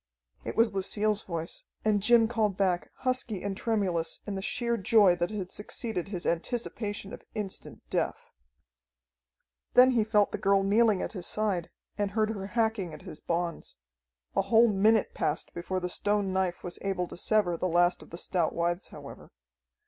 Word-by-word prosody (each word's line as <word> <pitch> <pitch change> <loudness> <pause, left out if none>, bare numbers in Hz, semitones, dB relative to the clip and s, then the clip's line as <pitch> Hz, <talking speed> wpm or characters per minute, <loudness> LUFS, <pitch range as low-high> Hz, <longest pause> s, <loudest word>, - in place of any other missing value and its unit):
It - - -5
was 225 -2 +4
Lucille's 210 +2 +1
voice, 165 -2 -5 0.2
and 210 -2 +3
Jim 230 +1 +5
called 215 -4 0
back, 185 -3 +1
husky 255 -6 -1
and 200 -1 -2
tremulous 190 -7 -1
in 205 - -4
the 190 - -3
sheer 235 +3 -1
joy 205 -3 +5
that 175 0 0
had 195 -4 -5
succeeded 210 -3 -4
his 185 -3 -5
anticipation 205 +2 -2
of - - -8
instant 205 -3 -5
death. - - -2 1.4
Then 255 +1 +8
he 235 -3 +3
felt 210 -1 +2
the - - -3
girl 195 0 +3
kneeling 210 0 +3
at - - -4
his 180 -4 -4
side, 205 -6 -1 0.3
and 205 -1 +1
heard 215 +1 0
her 195 -3 -5
hacking 220 -6 -1
at - - -13
his 165 -5 -8
bonds. 170 0 -3 0.6
A 195 - +4
whole 225 +4 +5
minute 215 +2 +3
passed 150 - -1
before 180 +2 -3
the 180 - -2
stone 205 +1 0
knife 190 -2 -1
was 175 -1 -4
able 190 -3 -1
to - - -9
sever 185 -2 +2
the 185 - -1
last 175 +1 +3
of - - -14
the 170 - -8
stout 175 -2 0
withes, 175 +2 -1
however. - - -11
200 Hz, 175 wpm, -29 LUFS, 180-215 Hz, 1.4 s, Then